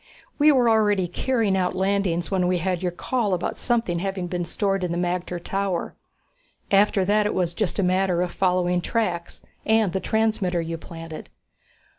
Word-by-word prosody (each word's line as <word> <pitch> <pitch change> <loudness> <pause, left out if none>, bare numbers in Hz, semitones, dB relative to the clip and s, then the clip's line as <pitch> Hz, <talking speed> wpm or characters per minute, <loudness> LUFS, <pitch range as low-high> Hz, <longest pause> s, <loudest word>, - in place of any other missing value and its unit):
We 300 +1 +6
were 255 -4 +3
already 210 -4 +3
carrying 220 +2 0
out 185 -1 0
landings 190 -3 0
when 185 -2 +1
we 180 0 +2
had 180 0 -1
your 180 -1 -1
call 210 +2 -1
about 175 - -4
something 230 -8 0
having 190 0 -3
been 175 0 -3
stored 195 +2 -1
in 180 - -1
the 170 - -2
magter 180 0 -2
tower. 195 0 -2 0.8
After 195 -1 +4
that 210 +1 +2
it - - -2
was 175 -2 0
just 195 +1 -2
a 200 - +1
matter 185 -1 +2
of 180 - -3
following 180 -1 +1
tracks 175 -4 -2 0.2
and 220 -4 +2
the 190 - 0
transmitter 215 -5 0
you 165 0 -4
planted." 165 -1 -9
185 Hz, 175 wpm, -24 LUFS, 175-205 Hz, 0.8 s, We